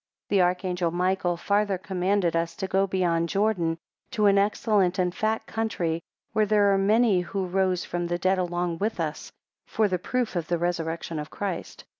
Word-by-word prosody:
4 -, -, +1 dB
The 190 Hz, -, +5 dB
archangel 180 Hz, -1 st, 0 dB
Michael 180 Hz, 0 st, 0 dB
farther 200 Hz, +2 st, +1 dB
commanded 185 Hz, -1 st, 0 dB
us 165 Hz, 0 st, -1 dB
to 190 Hz, -, -3 dB
go 195 Hz, +1 st, +2 dB
beyond 170 Hz, -3 st, 0 dB
Jordan, 190 Hz, -5 st, +1 dB, 0.3 s
to 215 Hz, -4 st, 0 dB
an 200 Hz, -1 st, +5 dB
excellent 200 Hz, -2 st, +2 dB
and 180 Hz, -2 st, +1 dB
fat 220 Hz, +2 st, -1 dB
country, 175 Hz, -7 st, -2 dB, 0.3 s
where 215 Hz, -1 st, +2 dB
there 205 Hz, -1 st, +4 dB
are -, -, +3 dB
many 210 Hz, -1 st, +3 dB
who 190 Hz, +2 st, -3 dB
rose 185 Hz, 0 st, 0 dB
from 175 Hz, 0 st, -3 dB
the 175 Hz, 0 st, -1 dB
dead 185 Hz, +1 st, +1 dB
along 175 Hz, -1 st, -2 dB
with 215 Hz, -1 st, -1 dB
us 155 Hz, -2 st, -4 dB, 0.4 s
for 220 Hz, -1 st, +1 dB
the 185 Hz, -2 st, -1 dB
proof 245 Hz, +3 st, -2 dB
of 170 Hz, -2 st, -2 dB
the 175 Hz, -, 0 dB
resurrection 165 Hz, -1 st, -2 dB
of 150 Hz, -, -6 dB
Christ. 200 Hz, -3 st, -5 dB
185 Hz, 185 wpm, -26 LUFS, 175-200 Hz, 0.4 s, The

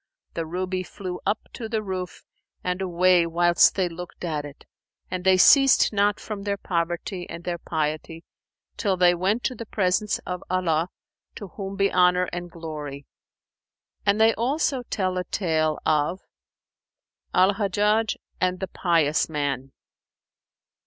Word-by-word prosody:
the 165 Hz, -1 st, -3 dB
ruby 185 Hz, +2 st, -2 dB
flew 185 Hz, 0 st, -6 dB
up 205 Hz, +2 st, +1 dB
to 225 Hz, -2 st, -6 dB
the 220 Hz, -1 st, -1 dB
roof 185 Hz, -2 st, -5 dB, 0.4 s
and 180 Hz, +1 st, -2 dB
away 180 Hz, -1 st, +3 dB
whilst 170 Hz, +1 st, +4 dB
they 185 Hz, -2 st, +1 dB
looked 175 Hz, +1 st, -9 dB
at 155 Hz, -3 st, -2 dB
it. 145 Hz, 0 st, -12 dB, 0.5 s
And 185 Hz, -1 st, -3 dB
they 190 Hz, 0 st, +5 dB
ceased 270 Hz, +5 st, +6 dB
not 205 Hz, 0 st, +2 dB
from 210 Hz, -2 st, -6 dB
their 200 Hz, 0 st, -2 dB
poverty 175 Hz, 0 st, -3 dB
and 170 Hz, +1 st, -7 dB
their 175 Hz, -1 st, -3 dB
piety, 160 Hz, +1 st, -3 dB, 0.5 s
till 195 Hz, -3 st, 0 dB
they 180 Hz, -1 st, +5 dB
went 195 Hz, +7 st, 0 dB
to 255 Hz, -, 0 dB
the 230 Hz, -2 st, -8 dB
presence 195 Hz, +1 st, +1 dB
of 180 Hz, -1 st, -4 dB
Allah, 175 Hz, -2 st, +1 dB, 0.5 s
to 205 Hz, -, -8 dB
whom 195 Hz, +1 st, -6 dB
be 195 Hz, 0 st, +1 dB
Honour 180 Hz, 0 st, +4 dB
and 175 Hz, 0 st, -5 dB
Glory! 150 Hz, -4 st, -7 dB, 1.0 s
And 200 Hz, +1 st, +2 dB
they 225 Hz, +1 st, +5 dB
also 265 Hz, +3 st, 0 dB
tell 185 Hz, -2 st, -1 dB
a -, -, -2 dB
tale 160 Hz, -5 st, 0 dB
of 155 Hz, +5 st, +1 dB, 1.1 s
AL 185 Hz, +2 st, +5 dB
HAJJAJ 210 Hz, +2 st, +1 dB, 0.3 s
AND 185 Hz, 0 st, +1 dB
THE 190 Hz, -, -4 dB
PIOUS 165 Hz, -5 st, +1 dB
MAN. 140 Hz, -3 st, -2 dB
180 Hz, 145 wpm, -25 LUFS, 170-200 Hz, 1.1 s, ceased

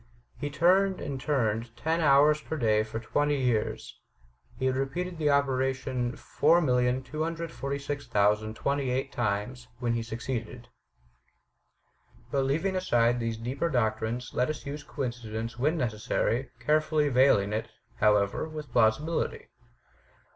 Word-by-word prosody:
He 145 Hz, -, -3 dB
turned 185 Hz, +5 st, +3 dB
and 135 Hz, -2 st, -5 dB
turned 115 Hz, -5 st, -1 dB
ten 160 Hz, +5 st, 0 dB
hours 150 Hz, +1 st, +5 dB
per 160 Hz, -, -5 dB
day 110 Hz, -5 st, +3 dB
for 110 Hz, +1 st, -4 dB
twenty 145 Hz, +5 st, 0 dB
years. 120 Hz, -4 st, -1 dB, 0.6 s
He 130 Hz, -, -2 dB
had 130 Hz, 0 st, +2 dB
repeated 170 Hz, +6 st, -3 dB
the 150 Hz, -2 st, +2 dB
operation 130 Hz, -3 st, 0 dB
4,246,028 135 Hz, -4 st, 0 dB
times, 120 Hz, +1 st, -2 dB
when 120 Hz, -1 st, -1 dB
he 115 Hz, -, -1 dB
succeeded." 120 Hz, +1 st, -5 dB, 1.6 s
But 135 Hz, -1 st, +1 dB
leaving 165 Hz, +8 st, 0 dB
aside 120 Hz, -9 st, +2 dB
these 115 Hz, -1 st, -2 dB
deeper 130 Hz, +8 st, -2 dB
doctrines, 115 Hz, -1 st, -1 dB
let 125 Hz, +3 st, +1 dB
us 155 Hz, -, -5 dB
use 145 Hz, +2 st, -5 dB
coinci 120 Hz, -6 st, -5 dB
dence 115 Hz, +2 st, -4 dB
when 155 Hz, +6 st, +1 dB
necessary, 115 Hz, +1 st, -1 dB
carefully 150 Hz, +3 st, +2 dB
veiling 125 Hz, -6 st, +4 dB
it, 110 Hz, -, -2 dB, 0.3 s
however, 105 Hz, +7 st, +2 dB
with 150 Hz, -4 st, -8 dB
plausibility. 125 Hz, +8 st, +1 dB
130 Hz, 120 wpm, -28 LUFS, 115-150 Hz, 1.6 s, hours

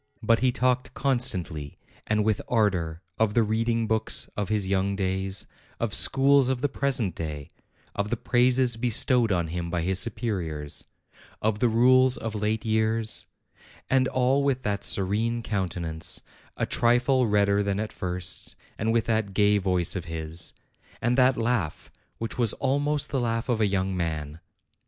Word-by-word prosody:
But 115 Hz, 0 st, +3 dB
he 130 Hz, -1 st, +2 dB
talked 125 Hz, 0 st, 0 dB
constantly, 95 Hz, -, -1 dB, 0.3 s
and 105 Hz, -1 st, +1 dB
with 110 Hz, -1 st, +1 dB
ardor, 90 Hz, -7 st, 0 dB, 0.2 s
of 110 Hz, -2 st, +1 dB
the 115 Hz, -, +4 dB
reading 115 Hz, +1 st, 0 dB
books 110 Hz, 0 st, +1 dB
of 105 Hz, -3 st, -2 dB
his 105 Hz, -3 st, 0 dB
young 100 Hz, +1 st, 0 dB
days; 95 Hz, -1 st, -2 dB, 0.3 s
of -, -, -1 dB
schools 135 Hz, -1 st, +4 dB
of 130 Hz, -2 st, -1 dB
the 145 Hz, -, +2 dB
present 130 Hz, -9 st, +1 dB
day; 75 Hz, -2 st, -6 dB, 0.4 s
of 100 Hz, +1 st, -2 dB
the 120 Hz, -, -1 dB
praises 125 Hz, 0 st, +2 dB
bestowed 120 Hz, 0 st, +2 dB
on 85 Hz, -3 st, 0 dB
him 85 Hz, 0 st, -4 dB
by 85 Hz, -1 st, -1 dB
his 95 Hz, +1 st, +1 dB
superiors; 80 Hz, -, -3 dB, 0.5 s
of 105 Hz, -1 st, 0 dB
the 120 Hz, -, +3 dB
rules 130 Hz, +3 st, +4 dB
of 115 Hz, -2 st, -5 dB
late 105 Hz, +1 st, -1 dB
years: 110 Hz, 0 st, 0 dB, 0.6 s
and 130 Hz, -1 st, +4 dB
all 130 Hz, +2 st, +2 dB
with 135 Hz, -2 st, 0 dB
that 100 Hz, -1 st, -2 dB
serene 110 Hz, +5 st, 0 dB
countenance, 90 Hz, -5 st, -2 dB, 0.4 s
a -, -, 0 dB
trifle 125 Hz, +1 st, +2 dB
redder 100 Hz, -1 st, +3 dB
than 100 Hz, 0 st, -1 dB
at 110 Hz, 0 st, -4 dB
first, 90 Hz, -2 st, -3 dB, 0.2 s
and 110 Hz, +2 st, +1 dB
with 115 Hz, -1 st, +1 dB
that 110 Hz, -4 st, -1 dB
gay 105 Hz, 0 st, +4 dB
voice 90 Hz, -2 st, +1 dB
of 90 Hz, -2 st, -4 dB
his, 80 Hz, 0 st, -5 dB, 0.5 s
and 120 Hz, +2 st, +1 dB
that 130 Hz, 0 st, +4 dB
laugh 115 Hz, -9 st, -2 dB, 0.3 s
which 115 Hz, +2 st, -5 dB
was 115 Hz, -4 st, +2 dB
almost 145 Hz, +2 st, -1 dB
the 135 Hz, -, 0 dB
laugh 115 Hz, 0 st, -1 dB
of 115 Hz, -3 st, +1 dB
a 105 Hz, -, +4 dB
young 95 Hz, -1 st, -1 dB
man. 80 Hz, -3 st, -3 dB
110 Hz, 160 wpm, -26 LUFS, 95-120 Hz, 0.6 s, the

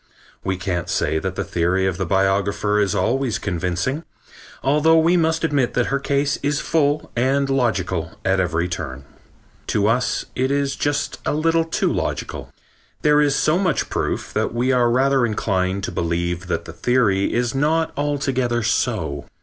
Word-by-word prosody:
We 95 Hz, -1 st, -1 dB
can't 90 Hz, -3 st, -3 dB
say 80 Hz, -, 0 dB
that 95 Hz, +2 st, -4 dB
the -, -, -2 dB
theory 90 Hz, +2 st, 0 dB
of 95 Hz, -2 st, -1 dB
the 95 Hz, -, -2 dB
biographer 100 Hz, +2 st, +1 dB
is 100 Hz, -3 st, +1 dB
always 125 Hz, -3 st, 0 dB
convincing, 90 Hz, -, -2 dB, 0.6 s
although 150 Hz, +4 st, +4 dB
we 165 Hz, +2 st, +4 dB
must 165 Hz, -1 st, +1 dB
admit 145 Hz, -6 st, +1 dB
that 125 Hz, -, +2 dB
her 140 Hz, -, +2 dB
case 140 Hz, +1 st, 0 dB
is 145 Hz, 0 st, 0 dB
full 150 Hz, -2 st, 0 dB
and 135 Hz, +3 st, +2 dB
logical 95 Hz, -10 st, 0 dB
at 95 Hz, 0 st, +2 dB
every 85 Hz, -1 st, 0 dB
turn. 70 Hz, -6 st, -5 dB, 0.6 s
To 105 Hz, -1 st, +1 dB
us 120 Hz, +4 st, +1 dB
it 130 Hz, +1 st, 0 dB
is 140 Hz, -1 st, 0 dB
just 145 Hz, 0 st, -1 dB
a -, -, -1 dB
little 165 Hz, +1 st, +2 dB
too 165 Hz, -, 0 dB
logical. -, -, -4 dB, 0.5 s
There 150 Hz, 0 st, +5 dB
is 145 Hz, -2 st, +2 dB
so 160 Hz, +4 st, +2 dB
much 185 Hz, -6 st, 0 dB
proof -, -, -2 dB
that -, -, -1 dB
we 125 Hz, +2 st, +1 dB
are 125 Hz, -2 st, +3 dB
rather 135 Hz, +2 st, +3 dB
inclined 100 Hz, -4 st, 0 dB
to -, -, -3 dB
believe 85 Hz, +1 st, -2 dB
that 85 Hz, -1 st, -2 dB
the 80 Hz, -, -9 dB
theory 100 Hz, -2 st, +1 dB
is 120 Hz, 0 st, 0 dB
not 155 Hz, +4 st, +1 dB
altogether 135 Hz, -5 st, 0 dB
so. -, -, -1 dB
120 Hz, 165 wpm, -21 LUFS, 95-140 Hz, 0.6 s, There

